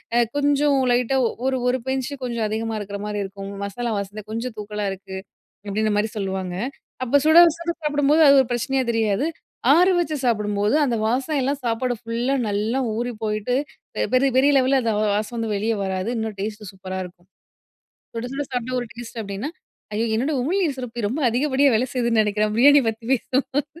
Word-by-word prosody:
அ - - +5 0.2
கொஞ்சம் 290 0 +3
லைட்டா 250 +2 +2 0.3
ஒரு 265 0 +1
ஒரு 250 +1 +2
பிஞ்ச்சு 265 +1 -1
கொஞ்சம் 235 -3 -1
அதிகமா 225 +1 -2
இருக்குற 200 0 -5
மாரி 210 0 -3
இருக்கும். 195 0 -7
"மசாலா 230 +4 -3
வாசன 200 +1 -5
கொஞ்சம் 230 +2 -4
தூக்கலா 210 0 -4
இருக்கு" 190 0 -8 0.5
அப்பிடீங்ற 215 +2 0
மாரி 210 +1 +1
சொல்லுவாங்க. 190 -2 -3 0.5
அப்ப 255 +3 +3
சுட 315 +2 +6 0.2
சுட 340 0 -2
சாப்பிடும்போது, 295 +1 +3
அது 280 - +8
ஒரு 260 - -3
பிரச்சனையா 260 +2 0
தெரியாது. 225 +3 +1 0.5
ஆற 355 +4 +5
வச்சு 315 -3 -1
சாப்பிடும்போது, 210 -1 +1
அந்த 245 -4 0
வாசம் 270 +6 0
எல்லாம் 275 +2 -1
சாப்பாடு 240 +2 0
ஃபுல்லா 235 +3 -1 0.2
நல்லா 215 +5 0 0.2
ஊறிபோயிட்டு, 225 0 -2 0.4
பெ - - 0
பெரிய 270 +1 +3
பெரிய 280 +2 +5
லெவல்ல, 265 +1 +3
அந்த 225 -2 +1
வா 215 - +2
வாசம் 215 +3 -2
வந்து, 225 -1 -2
வெளிய 220 +3 0
வராது. 190 +2 -2
இன்னும் 220 -2 -3
டேஸ்ட்டு 210 -1 -5
சூப்பரா 190 0 -6
இருக்கும். 175 0 -16 0.9
சுட 230 +1 -4
சுட 290 +1 -2
சாப்பிட்டா 250 +1 -2
ஒரு 240 - -6
டேஸ்டு. 235 0 -8
அப்பிடீன்னா 200 +7 -5 0.4
ஐய 220 +2 0
என்னோட 260 +8 0
உமிழ்நீர் 330 0 0
சுரப்பி 245 -2 -5
ரொம்ப 265 +8 -3
அதிகப்படியா 270 +3 +2
வேலை 245 +4 +2
செய்யுதுன்னு 235 -3 +2
நினைக்கிறேன் 210 0 0
பிரியாணி 285 +5 +7
பத்தி 225 +1 -4
பேசுவும் 265 +2 0
235 Hz, 175 wpm, -23 LUFS, 210-265 Hz, 0.9 s, அது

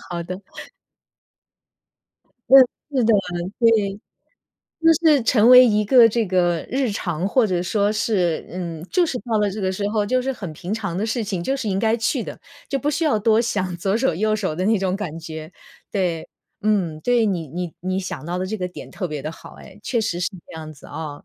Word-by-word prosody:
好 170 -1 -3
的。 180 +3 -6 2.1
嗯， 270 +1 +10 0.4
是 250 - +3
的， 220 -1 +4 0.4
对。 215 -4 +2 0.8
就 330 - +5 0.2
是 295 -5 +5
成 230 0 +4
为 255 0 +10
一 210 -2 +2
个 235 +2 +7
这 230 +1 0
个 175 -3 +1
日 260 -1 0
常， 180 -2 -2
或 245 +1 +3
者 180 -3 -1
说 205 +3 +1
是 190 -6 0
嗯， 170 -3 -5
就 360 - +3
是 270 -6 -2
到 225 +1 -2
了 210 -1 +1
这 210 +2 -5
个 190 -1 0
时 200 +2 -2
候 210 -1 0
就 255 +4 +1
是 270 +1 -1
很 200 -9 -7
平 175 +6 -6
常 200 -6 -3
的 200 - -1
事 225 +2 -1
情， 190 -5 -3
就 270 - 0
是 260 -5 -3
应 190 -1 0
该 225 +1 +2
去 225 - 0
的， - - -8 0.3
就 275 - -2
不 290 +2 0
需 330 +3 -1
要 285 -9 +2
多 220 +1 +3
想 190 -6 -2
左 190 +3 -1
手 230 -6 +1
右 215 +5 +1
手 195 -7 -2
的 180 +4 -2
那 220 +1 +3
种 190 -1 -1
感 170 -6 -5
觉。 160 0 -8 0.4
对， 180 -5 -1 0.4
嗯。 195 -7 0
对， 240 -2 +3
你 175 -6 -1
你 175 +3 -5
你 185 +1 -2
想 185 -4 -6
到 175 +2 -3
的 185 - -2
这 215 +3 -3
个 180 -3 -3
点 180 - -10
特 190 - -4
别 150 -3 -5
的 155 - -5
好 165 - -12
哎， - - -14
确 235 - 0
实 210 -6 -2
是 180 +3 -1 0.2
这 - - -13
样 155 -1 -8
子 145 - -15
啊。 150 -3 -7
200 Hz, 230 characters per minute, -22 LUFS, 175-225 Hz, 2.1 s, 嗯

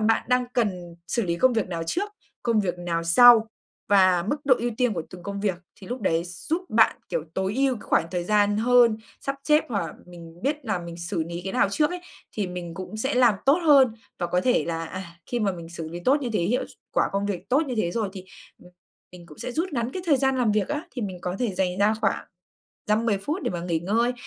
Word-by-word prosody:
bạn 220 +1 +2
đang 250 0 +2
cần 180 -7 -1
xử 235 - 0
lý 170 -1 -1
công 260 +6 +4
việc 220 -5 0
nào 165 -2 -3
trước, 405 - -1 0.3
công 230 -3 +2
việc 180 -2 -2
nào 170 -1 -2
sau 225 +5 +7 0.4
và 185 -3 +5
mức 290 - +1
độ 270 -2 +6
ưu 240 +1 -1
tiên 245 -3 +2
của 165 - -2
từng 180 -1 -10
công 200 0 -5
việc. 200 -3 +1 0.2
Thì 190 - -13
lúc 245 +1 -4
đấy 165 -4 +1
giúp 310 - -3
bạn, 220 0 +4
kiểu, 155 - -2
tối 190 +2 -1
ưu 270 -1 +2
cái - - -12
khoảng - - +1
thời 175 -1 -2
gian 205 0 +3
hơn, 235 -1 +4 0.2
sắp 275 0 -3
xếp, 300 0 +4
hoặc 205 -6 -1
là - - -8
mình 170 0 -13
biết 295 +1 -1
là 200 -5 -1
mình 170 -1 -8
xử 170 -1 -3
lý 170 +1 -5
cái 195 - -3
nào - - +3
trước 300 - +1
ấy, 360 - -5 0.3
thì 205 -3 -2
mình 175 -2 -6
cũng 190 +4 -7
sẽ 265 +5 -1
làm 245 -4 +5
tốt 285 +6 +5
hơn, 270 -6 +6 0.2
và 175 - -1
có 180 +1 +1
thể 250 +3 +2
là, 165 -1 -3
à, 185 +3 -6 0.2
khi 240 -1 -2
mà 200 -2 +1
mình 170 -2 -9
xử 165 -2 -7
lý 170 +2 -7
tốt 285 +3 +4
như 245 - -2
thế, - - +2
hiệu 230 +9 0
s - - -15 0.2
quả - - +2
công 200 +1 0
việc 195 -4 -4
tốt 280 +5 +4
như 255 - -3
thế 170 - +1
rồi, 220 -4 -1
thì, 190 -2 -9 0.4
ừm, 180 - -16 0.4
mình 175 -1 -12
cũng 150 - -15
sẽ 250 - -5
rút 335 +6 -1
ngắn 240 0 -2
cái 370 - -4
thời 290 -4 +5
gian 265 0 +2
làm 225 -4 +2
việc 210 -2 0
á. 295 +2 -2
Thì 245 - -4
mình 185 -3 -4
có 180 +1 -3
thể 220 -6 0
dành 185 0 -1
ra 210 +2 +3
khoảng 195 - 0 0.6
dăm 215 +2 +1
mười 205 -3 +2
phút 300 - -3
để - - -1
mà 175 -1 -4
nghỉ 170 -2 -1
ngơi, 230 +7 +1
205 Hz, 260 wpm, -25 LUFS, 180-245 Hz, 0.6 s, sau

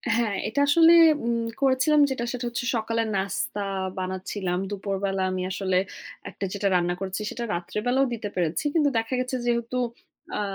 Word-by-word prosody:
হ্যাঁ, 230 -4 +1
এটা 220 +6 -2
আসলে 330 +3 +7 0.3
উম 235 0 +1 0.2
করেছিলাম 275 +3 +4
যেটা 240 -3 -2
সেটা 250 -1 -4
হচ্ছে 235 +1 -3
সকালের 230 0 0
নাস্তা 200 +1 -2 0.4
বানাচ্ছিলাম। 185 0 -3
দুপুরবেলা 195 -1 -2
আমি 185 0 -2
আসলে 190 -1 0 0.5
একটা 200 - -5
যেটা 200 -1 0
রান্না 175 0 +2
করেছি 195 +2 -4
সেটা 240 - -5
রাত্রে 175 +4 -3
বেলাও 265 +2 +3
দিতে 215 -3 -4
পেরেছি। 175 - -1
কিন্তু 300 -3 +3
দেখা 225 +2 -1
গেছে 255 +1 -2
যেহেতু 235 +1 0 0.6
আ - - -1
220 Hz, 160 wpm, -25 LUFS, 190-250 Hz, 0.6 s, আসলে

